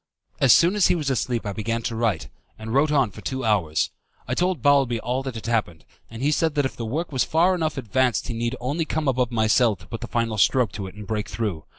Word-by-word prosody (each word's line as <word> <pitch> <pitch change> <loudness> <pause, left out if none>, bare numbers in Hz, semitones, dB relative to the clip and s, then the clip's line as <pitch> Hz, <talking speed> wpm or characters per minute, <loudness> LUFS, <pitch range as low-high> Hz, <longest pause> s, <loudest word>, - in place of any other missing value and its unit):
As 135 - +5
soon 175 - +5
as 205 - +4
he - - +3
was 150 -5 -1
asleep 120 -2 -1
I 100 - -3
began 115 +3 -2
to 115 - -3
write, 115 -2 0 0.3
and 110 +1 -6
wrote 145 +3 +3
on 135 -7 +2
for - - -11
two 130 -2 -3
hours. 90 -9 +1 0.4
I 120 - -2
told 180 +5 0
Balbi 140 -4 +4
all 125 +3 -2
that 130 -3 -6
had 110 - -7
happened, 110 -8 -1 0.2
and 115 +3 -7
said 160 0 0
that 145 -2 +2
if 130 - -3
the 115 - -5
work 160 +8 -3
was 130 -3 +1
far 170 +4 +3
enough 160 -5 -1
advanced 130 0 0
he 120 - -3
need 120 +2 -2
only 140 +7 -1
come 155 -1 -2
above 125 -2 +1
my 110 -2 +1
cell 110 0 +3
to 90 -1 -17
put 115 +5 -7
the 120 - -5
final 115 -3 -1
stroke 125 0 +3
to 100 -1 -6
it 95 - -11
and 105 0 -9
break 105 0 -3
through. 95 -9 -3
120 Hz, 255 wpm, -24 LUFS, 110-140 Hz, 0.4 s, As